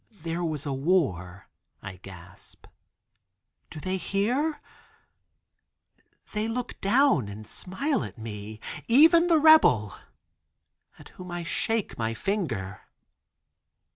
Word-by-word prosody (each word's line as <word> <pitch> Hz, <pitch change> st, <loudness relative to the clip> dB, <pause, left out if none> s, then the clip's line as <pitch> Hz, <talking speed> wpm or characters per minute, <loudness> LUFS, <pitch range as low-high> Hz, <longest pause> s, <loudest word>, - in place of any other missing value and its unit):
"There 170 Hz, +1 st, -3 dB
was 155 Hz, -4 st, -3 dB
a 140 Hz, -, -2 dB
war," 130 Hz, -, -1 dB, 0.4 s
I 95 Hz, -1 st, -8 dB
gasp. 95 Hz, -1 st, -14 dB, 1.0 s
"Do 155 Hz, -, -9 dB
they 185 Hz, +5 st, -2 dB
hear? 250 Hz, -, -1 dB, 1.7 s
They 210 Hz, +1 st, -1 dB
look 245 Hz, +2 st, -5 dB
down 235 Hz, -, +3 dB
and 105 Hz, +2 st, -9 dB
smile 270 Hz, -, -3 dB
at -, -, -9 dB
me, 110 Hz, -1 st, -8 dB, 0.3 s
even 330 Hz, +7 st, +6 dB
the 335 Hz, -2 st, +4 dB
rebel, 305 Hz, -, +5 dB, 1.0 s
at -, -, -14 dB
whom 180 Hz, 0 st, -11 dB
I 175 Hz, 0 st, -4 dB
shake 225 Hz, -, -2 dB
my 115 Hz, 0 st, -1 dB
finger." 115 Hz, -, -3 dB
175 Hz, 105 wpm, -26 LUFS, -, 1.7 s, even